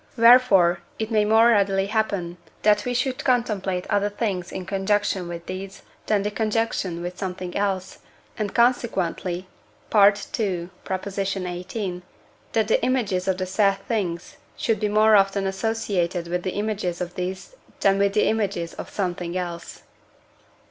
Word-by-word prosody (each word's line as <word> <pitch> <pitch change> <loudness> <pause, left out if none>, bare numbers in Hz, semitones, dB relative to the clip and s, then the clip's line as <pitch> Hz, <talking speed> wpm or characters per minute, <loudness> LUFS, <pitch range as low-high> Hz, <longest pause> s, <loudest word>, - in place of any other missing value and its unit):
Wherefore 230 -8 +6 0.2
it 220 +1 -3
may 215 -1 +3
more 225 +2 +5
readily 195 -3 +3
happen, 200 -5 -1 0.3
that 210 0 +4
we 250 - -1
should 255 +1 -1
contemplate 210 -8 0
other 205 0 +2
things 200 -4 -3
in 185 - -5
conjunction 195 -1 0
with 170 0 -7
these 190 +1 -7 0.2
than 205 -2 +1
in 210 - 0
conjunction 215 -5 -1
with 180 +1 -6
something 180 -1 -5
else, 195 -2 -2 0.4
and 210 -3 -3
consequently 190 -7 +1 0.5
(II. 200 -3 +3
xviii.) 190 0 -4 0.5
that 220 -2 +2
the 220 - +2
images 205 -8 0
of 190 -1 +1
the 185 - -2
said 195 +1 +2
things 180 -7 -3 0.2
should 225 -2 0
be 210 - 0
more 215 +1 +5
often 195 0 +3
associated 190 -4 -1
with 180 +1 -1
the 185 0 -3
images 205 -4 -2
of 175 -1 -4
these 185 - -5 0.3
than 195 0 +3
with 200 0 +2
the 210 - +3
images 200 -6 -1
of - - -8
something 180 -2 -3
else. 175 -2 -6
195 Hz, 145 wpm, -24 LUFS, 180-215 Hz, 0.5 s, Wherefore